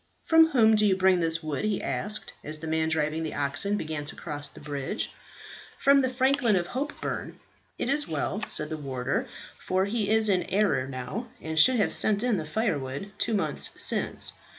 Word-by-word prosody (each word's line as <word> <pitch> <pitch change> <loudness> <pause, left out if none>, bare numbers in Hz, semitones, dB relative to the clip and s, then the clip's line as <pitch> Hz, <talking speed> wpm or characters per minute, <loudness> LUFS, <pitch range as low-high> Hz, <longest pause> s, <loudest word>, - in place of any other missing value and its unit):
"From 325 0 +6
whom 225 -8 +4
do 215 - +2
you 195 -3 +3
bring 190 -1 +3
this 165 -1 0
wood?" 155 +1 -3
he 215 -2 0
asked, 210 +1 0
as 155 +1 -4
the 160 - -8
man 160 0 0
driving 160 0 -1
the 160 - -4
oxen 145 +9 +1
began 155 -4 -4
to 145 - -7
cross 145 -2 -4
the - - -13
bridge. 145 +6 -4 0.7
"From 275 0 +4
the 260 - 0
franklin 260 -3 +2
of 175 -2 -1
Hopeburn." 285 +4 -4 0.4
"It - - -2
is 285 +3 0
well," 165 +7 -3
said 150 0 +1
the 155 - -3
warder, 130 -4 -3 0.3
"for 185 +1 0
he 205 0 -2
is 220 0 +4
in 190 -3 +2
arrear 195 -10 +1
now, 135 - -6
and 160 0 -2
should 255 +11 +7
have 210 - +1
sent 210 0 +3
in 245 -4 +1
the 155 -3 -5
firewood 155 - -2
two 225 - +1
months 155 -7 +1
since. - - +1
185 Hz, 195 wpm, -27 LUFS, 155-220 Hz, 0.7 s, should